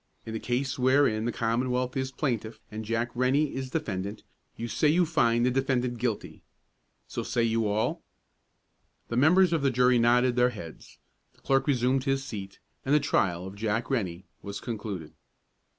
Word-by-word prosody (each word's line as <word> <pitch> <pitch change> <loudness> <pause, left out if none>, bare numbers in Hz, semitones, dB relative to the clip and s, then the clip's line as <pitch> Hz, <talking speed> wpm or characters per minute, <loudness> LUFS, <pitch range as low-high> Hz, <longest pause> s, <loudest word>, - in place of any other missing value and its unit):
In 110 - -6
the 110 - -2
case 130 +2 -2
wherein 130 -4 +3
the 120 - 0
Commonwealth 125 +2 -1
is 130 0 -2
plaintiff 115 -6 -2
and 110 +1 -5
Jack 115 +2 -1
Rennie 135 +4 +1
is 130 0 -4
defendant, 105 -9 -3 0.3
you 115 - -4
say 120 +7 +1
you 170 +4 +4
find 120 -7 +2
the 125 - +3
defendant 125 -2 0
guilty. 115 -3 -3 0.7
So - - -4
say 120 - 0
you 115 -1 +1
all?" 105 +2 0 1.1
The 115 - -2
members 175 +6 +5
of 165 - +1
the 135 - +3
jury 125 -1 +4
nodded 120 +1 +3
their 125 0 +5
heads, 100 -9 -10 0.4
the - - -28
clerk 135 0 +1
resumed 130 0 +2
his 135 -1 0
seat, 100 -7 -7 0.3
and 140 +2 +2
the - - +6
trial 90 - 0
of 95 - -7
Jack 110 +4 -2
Rennie 95 -8 -2 0.2
was 100 0 -6
concluded. 100 -8 -5
120 Hz, 170 wpm, -28 LUFS, 110-135 Hz, 1.1 s, the